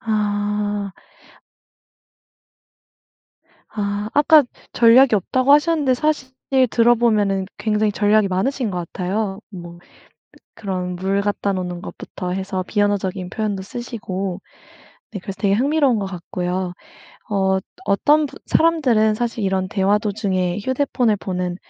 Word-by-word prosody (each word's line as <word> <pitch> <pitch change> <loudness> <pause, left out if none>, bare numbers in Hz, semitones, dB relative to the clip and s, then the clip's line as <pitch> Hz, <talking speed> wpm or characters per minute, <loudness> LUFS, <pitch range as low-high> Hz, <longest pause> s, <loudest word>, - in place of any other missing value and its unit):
아. 205 -1 -1 2.8
아. 205 0 -3
아까 300 +1 +6 0.3
전략이 240 +1 +6
없다고 255 +7 +2
하셨는데 295 -3 +3
사실 295 -1 -1 0.4
들어보면은 220 -5 +2
굉장히 210 -1 +1
전략이 210 0 +3
많으신 225 +6 -1
것 180 - -3
같아요. 190 +4 -3
뭐 175 -3 -10
그 175 - -23 0.8
그런 180 -2 -3
물 195 +2 0
갖다 200 0 -1
놓는 180 -2 -4
것부터 180 -2 -7
해서 190 0 -3
비언어적인 200 -3 -1
표현도 205 -3 -2
쓰시고. 195 -4 -5 0.7
네. 200 - -5
그래서 190 +1 -7
되게 195 0 +2
흥미로운 270 0 +2
것 195 - -2
같고요. 180 0 -4 0.6
어. 205 - -2 0.2
어 190 - +1
또 - - -21
어떤 295 +10 +3
분 - - -13
사람들은 250 -10 +3
사실 230 -1 -3
이런 190 -1 0
대화 195 +1 +2
도중에 200 -3 -1
휴대폰을 255 -2 0
보는 180 -2 -3
205 Hz, 270 characters per minute, -20 LUFS, 190-230 Hz, 2.8 s, 아까